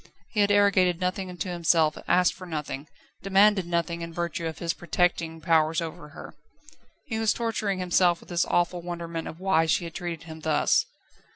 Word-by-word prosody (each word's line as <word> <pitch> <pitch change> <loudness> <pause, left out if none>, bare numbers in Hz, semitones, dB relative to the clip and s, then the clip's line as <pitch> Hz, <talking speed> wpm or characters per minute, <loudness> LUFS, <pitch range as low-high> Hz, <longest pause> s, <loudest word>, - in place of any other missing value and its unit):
He 215 - -2
had 205 0 +4
arrogated 195 -4 +3
nothing 185 +1 -2
unto 180 +1 -5
himself, 165 -3 +2
asked 180 -1 +3
for 185 - -11
nothing, 150 -3 -5 0.3
demanded 195 -1 +4
nothing 170 0 -1
in 165 0 -6
virtue 170 -1 -3
of 160 -1 -6
his 165 -1 -2
protecting 170 -2 -1
powers 160 -1 +2
over 165 -2 -6
her. 150 - -11 0.7
He 225 -6 -3
was 225 -1 +2
torturing 220 -4 -2
himself 180 -1 +2
with - - -18
this 175 -1 +1
awful 175 0 0
wonderment 170 -1 -5
of 160 - -8
why 185 -4 +2
she 165 - +2
had 165 -1 -7
treated 170 -3 -5
him 160 -1 -10
thus. 155 -1 +2
175 Hz, 180 wpm, -26 LUFS, 165-185 Hz, 0.7 s, had